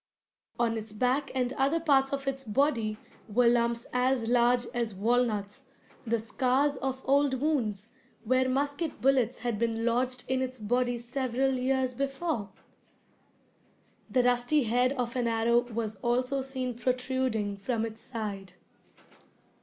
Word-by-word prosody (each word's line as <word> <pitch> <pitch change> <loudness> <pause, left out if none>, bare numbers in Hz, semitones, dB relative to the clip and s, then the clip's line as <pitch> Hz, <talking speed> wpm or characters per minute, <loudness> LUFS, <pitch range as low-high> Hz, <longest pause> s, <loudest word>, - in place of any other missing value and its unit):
On 230 -1 +1
its 215 0 -9
back 255 +5 +1
and 250 0 0
other 280 +5 +1
parts 275 -4 +3
of 275 -1 -3
its 270 0 -2
body 230 -3 +1 0.3
were 240 +3 +3
lumps 235 0 +2
as 250 -2 +1
large 245 0 +4
as 235 -4 -2
walnuts, 215 -1 0 0.4
the 230 +1 +2
scars 255 +5 +1
of 265 0 -3
old 275 -1 +3
wounds, 230 -9 -1 0.3
where 255 +2 +2
musket 285 +4 -1
bullets 265 -3 +2
had 235 -4 -2
been 230 0 0
lodged 250 +1 0
in 260 0 0
its 255 -1 -4
body 245 +3 0
several 255 +2 -1
years 260 0 0
before! 275 - -2 1.6
The 255 -1 +2
rusty 245 +4 +3
head 245 +3 +2
of 245 -3 -3
an 245 -2 0
arrow 235 +1 +2
was 220 -2 -3
also 250 +5 0
seen 260 -1 -3
protruding 250 -4 -1
from 225 +3 -1
its 225 0 -8
side. 210 -6 -6
250 Hz, 140 wpm, -29 LUFS, 230-265 Hz, 1.6 s, large